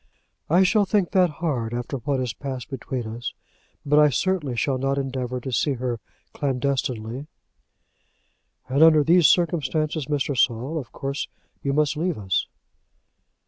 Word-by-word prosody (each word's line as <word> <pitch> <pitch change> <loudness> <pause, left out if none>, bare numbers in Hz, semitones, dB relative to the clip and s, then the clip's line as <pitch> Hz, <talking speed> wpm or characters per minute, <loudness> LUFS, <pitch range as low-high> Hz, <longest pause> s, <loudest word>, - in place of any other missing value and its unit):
"I 175 +4 +5
shall 205 +2 +3
think 195 -3 +1
that 185 -2 +4
hard 140 -8 -2
after 125 +3 -3
what 135 +2 -1
has 125 -4 -2
passed 130 +2 -6
between 130 -2 -4
us; 115 +2 -5 0.5
but 150 +1 +4
I 150 0 +6
certainly 150 -1 0
shall 135 +1 0
not 135 +1 0
endeavour 130 -2 -2
to 130 +2 -6
see 140 +4 +1
her 120 -2 -3 0.3
clandestinely." 130 -2 -2 1.4
"And 135 +3 +1
under 160 -2 +7
these 170 +1 +6
circumstances, 155 -3 +1
Mr. 145 -1 -1
Saul, 125 +6 +1
of 130 - -9
course 140 0 -4 0.3
you 140 - -1
must 150 +1 +2
leave 170 0 -1
us." 95 -4 -1
140 Hz, 145 wpm, -24 LUFS, 125-155 Hz, 1.4 s, under